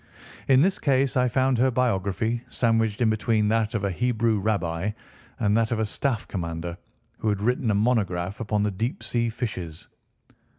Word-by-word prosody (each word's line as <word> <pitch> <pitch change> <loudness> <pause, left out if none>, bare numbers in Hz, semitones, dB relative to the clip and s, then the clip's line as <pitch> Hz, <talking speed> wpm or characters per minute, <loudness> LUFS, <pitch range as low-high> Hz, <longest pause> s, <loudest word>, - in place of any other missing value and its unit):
In 135 +1 +6
this 190 +2 +1
case 135 -1 +2
I 125 -1 +3
found 130 0 +1
her 130 +2 +4
biography 115 -1 0
sandwiched 115 -2 +1
in 110 -2 +4
between 110 -1 +1
that 110 0 +1
of 105 - -1
a 100 - 0
Hebrew 115 +1 +1
rabbi 95 -3 -1 0.5
and 105 0 +2
that 115 -1 +2
of 115 - +1
a 110 - +1
staff 120 +2 -2
commander 85 -2 -4 0.4
who 110 - 0
had 105 -2 0
written 120 +2 0
a 105 - +2
monograph 100 -4 0
upon 105 -2 0
the 105 - +1
deep 115 - -3
sea 120 -1 0
fishes. 90 -9 -5
110 Hz, 175 wpm, -25 LUFS, 100-120 Hz, 0.5 s, In